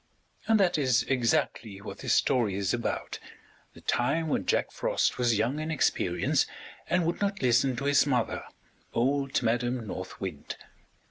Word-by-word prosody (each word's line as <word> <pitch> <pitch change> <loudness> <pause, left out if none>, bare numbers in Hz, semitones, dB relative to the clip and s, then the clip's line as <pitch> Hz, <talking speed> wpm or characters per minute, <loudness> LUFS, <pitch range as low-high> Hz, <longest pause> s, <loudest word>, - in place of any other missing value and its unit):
And 225 -1 +4
that 180 -5 +3
is 130 -4 +3
exactly 115 -5 0
what - - -9
this - - +1
story 115 -7 +2
is 100 -2 0
about, 120 -1 -3 0.6
the - - -13
time 155 +7 0
when - - -1
Jack - - +1
Frost - - 0
was 120 -3 +2
young 120 +8 0
in 155 +1 -3
experience 155 -3 +1 0.4
and 175 -1 +2
would 170 +4 -2
not 200 -5 -1
listen 125 +1 +3
to 140 - -4
his 145 0 +4
mother, 125 -5 0 0.5
old 135 +3 +1
Madam 120 +1 0
North 95 -2 -7
Wind. 95 -7 -5
125 Hz, 155 wpm, -28 LUFS, 115-145 Hz, 0.6 s, And